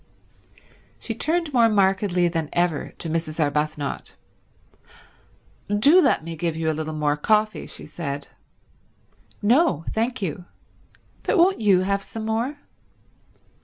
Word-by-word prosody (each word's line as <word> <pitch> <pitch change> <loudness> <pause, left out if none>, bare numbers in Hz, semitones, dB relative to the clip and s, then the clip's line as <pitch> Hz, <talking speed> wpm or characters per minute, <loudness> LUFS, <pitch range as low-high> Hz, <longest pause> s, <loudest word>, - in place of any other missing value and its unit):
She 230 - -5
turned 315 +5 -1
more 235 -2 +5
markedly 190 -3 +2
than 165 -3 -2
ever 175 -4 0
to - - -5
Mrs. 160 0 -3
Arbuthnot. 150 -1 -2 1.5
"Do 280 - +6
let 160 - +2
me 165 0 -6
give 165 0 -2
you 160 0 0
a - - -2
little 155 0 -4
more 150 -1 +1
coffee," 215 +7 +1
she - - -9
said. 145 -3 -5 1.2
"No, 230 - +3
thank 235 +3 -1
you. 180 -2 -4 0.8
But - - 0
won't 365 +3 +4
you 200 -4 +4
have 200 +1 0
some 220 +2 -7
more?" 230 +6 -1
185 Hz, 130 wpm, -23 LUFS, 155-225 Hz, 1.5 s, Do